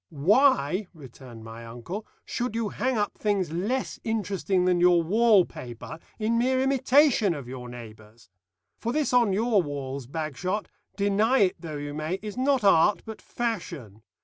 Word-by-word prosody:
"Why," 185 - +3
returned 125 -5 -12
my 115 +1 -9
uncle, 120 - -7 0.2
"should 245 -2 -3
you 225 -2 -1
hang 255 +2 -1
up 205 -1 -2
things 200 -6 0
less 210 +11 -2
interesting 200 -4 -1
than 180 -1 +2
your 175 -1 +5
wall 210 +1 +4
paper, 150 +1 -9 0.2
in 230 +1 0
mere 260 +2 +2
imitation 265 - +3
of 140 -4 -8
your 125 -1 -8
neighbours? 110 -2 -12 0.5
For 235 - -2
this 295 -3 0
on 240 -4 +4
your 215 +1 +2
walls, 140 -4 -5
Bagshot, 160 +7 -3 0.3
deny 210 +5 +2
it 185 -2 +2
though 155 -3 -6
you 145 0 -5
may, 155 +4 -2
is 210 -2 -6
not 260 -1 +1
art 195 +1 +4
but 220 -1 -8
fashion. 170 - -5
185 Hz, 155 wpm, -26 LUFS, 145-225 Hz, 0.5 s, your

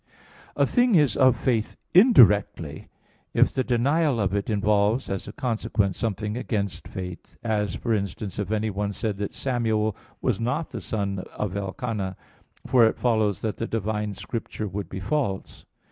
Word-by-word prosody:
A - - +3
thing 245 -3 +3
is 145 - +4
of 130 -3 +5
faith, 115 -3 0 0.2
indirectly, 105 - +5 0.5
if - - +4
the 130 - +1
denial 135 +3 +2
of 100 -2 0
it 100 +1 -1
involves 105 +3 +2
as 95 - -3
a - - -5
consequence 110 -7 -1
something 105 -1 -2
against 105 -6 -3
faith; 90 -1 -8
as 105 -3 0
for 115 - -1
instance 100 -1 -3
if 100 -3 -2
anyone 105 -1 -1
said 105 -1 -2
that 100 - -2
Samuel 110 -5 0 0.2
was - - 0
not 125 +8 -1
the - - -5
son 100 -3 -2 0.2
of 105 -3 -2
Elcana, 100 0 -3 0.5
for 125 -3 +5
it - - -1
follows 110 -5 +1
that 110 -2 -2
the 115 - -3
divine 105 -1 -2
Scripture 110 -1 -5
would 100 -2 -5
be 95 - -5
false. 100 -2 -2
110 Hz, 160 wpm, -25 LUFS, 100-120 Hz, 0.5 s, of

